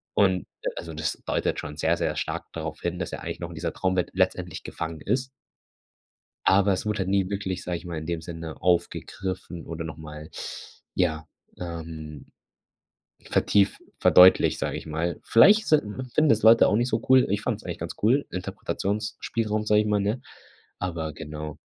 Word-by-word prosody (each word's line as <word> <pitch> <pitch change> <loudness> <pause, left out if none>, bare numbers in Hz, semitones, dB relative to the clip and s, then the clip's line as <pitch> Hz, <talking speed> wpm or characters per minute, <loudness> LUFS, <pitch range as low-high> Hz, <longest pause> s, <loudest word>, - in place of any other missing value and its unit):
und, 95 -3 +4 0.2
äh, - - 0
also, 85 -1 -6
das 80 +1 -1
deutet - - 0
schon 75 0 -7
sehr, - - +2
sehr - - -1
stark - - -4
darauf 80 -1 -5
hin, 85 0 -2
dass 90 - -3
er - - -5
eigentlich - - -5
noch 85 - -4
in 85 - -9
dieser 80 0 -3
Traumwelt 95 -1 0
letztendlich 90 -2 0
gefangen 80 -1 -5
ist 125 0 -1 1.2
aber 100 +1 +5
es 95 - -3
wurde 105 0 -1
halt 95 -1 -1
nie 95 -1 +2
wirklich, 95 -2 -3
sage 90 -1 -2
ich 85 - -12
mal, 85 -2 -4
in 80 - -7
dem 85 -1 -2
Sinne 80 -1 -7
aufgegriffen 90 -1 -1
oder 80 0 -5
noch 80 -1 -7
mal 75 0 -9 0.7
ja, 80 +1 0 0.3
ähm, 80 -4 -7 1.0
vertieft 100 -2 +2 0.2
verdeutlicht, 90 +1 +7
sage - - -2
ich - - -7
mal. 80 +1 -2
Vielleicht 210 - +6
sind 155 -1 +5 0.3
finden 155 -1 +4
es 110 -1 +3
Leute 115 +1 +7
auch 105 - +3
nicht 120 +2 +1
so 110 0 0
cool. 130 -1 +6
Ich 100 - 0
fand - - -1
es - - -18
eigentlich - - -5
ganz - - -5
cool, 130 +7 +3
Interpretationsspielraum, 105 +3 -2
sage 105 0 +5
ich - - -4
mal, 105 -1 +2
ne? 105 +5 -1 0.6
Aber 85 -4 -3
genau. 75 0 -7
90 Hz, 180 wpm, -26 LUFS, 80-105 Hz, 1.2 s, verdeutlicht